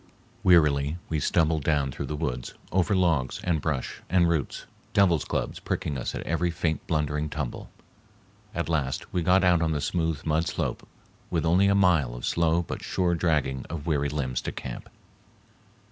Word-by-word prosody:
Wearily 75 -3 +4
we 80 - 0
stumbled 80 0 +2
down 70 -2 +1
through - - -5
the 75 - -3
woods, 65 -5 -3 0.2
over 95 +2 +2
logs 80 -9 +1
and 80 -4 0
brush 70 -5 -3
and 90 0 +4
roots, 80 -5 -1 0.3
devil's 90 -6 +4
clubs - - -3
pricking 70 - -2
us 65 - -3
at - - -4
every 85 +2 0
faint 85 -2 -2
blundering 75 -1 0
tumble. 75 -4 -5 0.9
At 85 - -1
last 75 -5 -2
we 90 - +1
got 90 +3 +4
out 90 -2 +4
on 80 -1 +1
the 75 - -1
smooth 80 0 -1
mud 80 +1 +1
slope - - -3 0.4
with 85 -2 0
only 90 +4 +4
a 100 - +4
mile 85 -11 +3
of - - -5
slow 85 0 +2
but - - -6
sure 90 -2 0
dragging 75 -6 0
of 80 -3 -5
weary 75 -3 +1
limbs 70 -4 -2
to - - -4
camp. - - -7
80 Hz, 175 wpm, -27 LUFS, 75-85 Hz, 0.9 s, Wearily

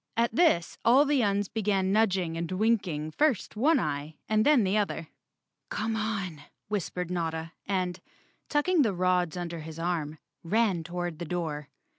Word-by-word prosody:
At 230 -1 +2
this 280 - +3
all 260 +5 +6
the 285 -2 +2
Uns 205 -2 +1
began 195 -3 0
nudging 190 -6 +2
and 165 +1 -3
winking 185 -7 0
first 265 - +1
one 280 +7 +4
eye 150 -1 -3
and 215 0 +3
then 290 -4 +5
the 190 +1 +1
other. 200 -6 -1 0.6
"Come 220 +1 -2
on," 200 -8 -3 0.3
whispered 180 -3 -3
Notta 165 -2 -2 0.2
and, 185 -2 -1 0.5
tucking 315 +3 +3
the 220 -7 +2
rods 180 -1 +1
under 170 -1 -4
his 160 0 -8
arm, 165 -3 -2 0.3
ran 195 -1 +1
toward 175 -1 -4
the 175 - -4
door. 155 -4 -3
185 Hz, 155 wpm, -28 LUFS, 165-220 Hz, 0.6 s, all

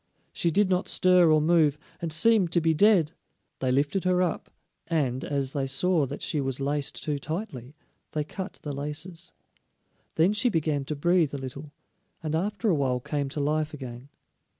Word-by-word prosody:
She 170 - +1
did 200 +5 +3
not 185 0 0
stir 180 -2 +4
or 155 - +5
move, 155 -2 +3 0.2
and 165 -2 -3
seemed 185 +2 +4
to 170 - +4
be 165 -1 +2
dead. 180 -3 +4 0.5
They 130 -1 0
lifted 145 +8 +1
her 185 0 +2
up, 175 - -3 0.4
and, 140 -6 0
as 140 -2 -2
they 135 -2 -1
saw 155 +2 +2
that 140 - -6
she 150 - -1
was 135 -1 -2
laced 140 +1 -2
too 150 -2 -2
tightly, 155 - -6 0.4
they 150 - 0
cut 190 +6 -6
the 150 - -4
laces; 150 +5 -5 0.8
then 170 +6 +3
she 230 +4 +2
began 155 -7 -1
to 150 - -3
breathe 165 -1 +2
a - - -3
little, 140 +3 -8 0.5
and 155 -1 -3
after 205 +7 -1
a 195 - +4
while 130 -4 0
came 140 +2 -3
to 145 - -4
life 150 +1 -1
again. 130 -1 -9
155 Hz, 180 wpm, -27 LUFS, 140-175 Hz, 0.8 s, or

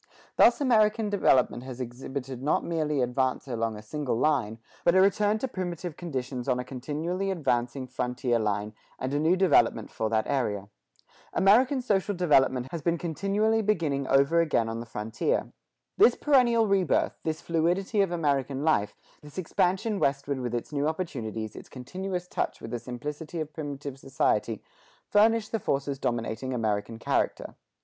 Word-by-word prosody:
Thus 240 - +6
American 220 -5 +3
development 130 -11 +3
has 130 -1 -8
exhibited 130 +1 -6
not 145 +3 +1
merely 155 -5 0
advance 130 +2 -1
along 115 -3 -2
a 105 - -10
single 140 +3 -2
line, 125 -6 +1 0.3
but 170 - +4
a - - +6
return 205 +2 +3
to 265 - -2
primitive 175 - -5
conditions 130 -6 -4
on 125 - +2
a 125 - -2
continually 155 +9 -3
advancing 130 -6 -1
frontier 125 -1 -1
line, 105 0 -1 0.2
and 130 +2 -3
a 145 - +1
new 160 +4 +3
development 165 -11 +3
for 110 - -2
that 110 0 +1
area. 105 -8 -1 0.6
American 250 +7 +4
social 205 -3 +1
development 135 -7 +3
has 170 - -4
been 170 +3 +1
continually 200 +7 0
beginning 160 -10 0
over 140 +5 +4
again 155 -8 +1
on 115 0 -4
the 120 - -7
frontier. 110 0 -2 0.5
This 240 - +7
perennial 245 -6 +4
rebirth, 195 -4 +1
this 160 -1 -2
fluidity 175 +5 +1
of 195 -3 +1
American 140 -4 0
life, 155 -10 +1 0.3
this 150 +2 -14
expansion 185 +4 0
westward 140 -1 0
with 120 -1 -3
its 120 - -4
new 145 +1 0
opportunities, 115 - -4
its - - -11
continuous 180 +7 -5
touch - - -2
with 115 - -8
the 120 - -2
simplicity 145 +7 -6
of 155 -1 -5
primitive 140 -2 -6
society, 115 -5 0 0.5
furnish 220 +1 +4
the 225 - -1
forces 140 -5 -1
dominating 120 +2 -2
American 110 -1 -1
character. - - -1
145 Hz, 155 wpm, -27 LUFS, 125-185 Hz, 0.6 s, This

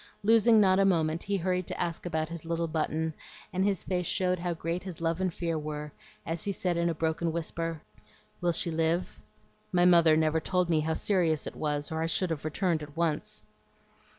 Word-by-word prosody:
Losing 225 +1 +5
not 190 -2 +5
a - - +5
moment, 165 -4 +2
he 200 0 -1
hurried 180 0 -1
to - - -5
ask 170 0 -2
about 160 -2 -1
his 170 -1 -7
little 165 0 -1
Button, 160 0 -1 0.4
and 185 +1 +1
his 195 -3 +1
face 180 -2 -2
showed 180 -1 0
how 175 0 -2
great 165 +2 -3
his 185 -4 -8
love 165 +1 -1
and 185 -1 +1
fear 165 -1 -2
were, 150 0 -5 0.3
as 165 0 -3
he 200 - -1
said 180 -2 -1
in 170 0 +1
a 165 - -1
broken 160 +1 -1
whisper, 165 -1 -3 0.6
"Will 175 -1 +2
she 170 +1 0
live? 165 +2 -1 0.5
My 175 -1 +4
mother 170 -3 +6
never 160 0 +2
told 180 +1 0
me 160 - +3
how 160 +1 0
serious 170 -7 +1
it - - -5
was, 145 -1 -2
or 160 0 -2
I 165 - 0
should 175 +1 +1
have 155 -2 -4
returned 165 +1 0
at 150 +1 -10
once." 165 -3 -1
165 Hz, 205 wpm, -29 LUFS, 160-180 Hz, 0.6 s, mother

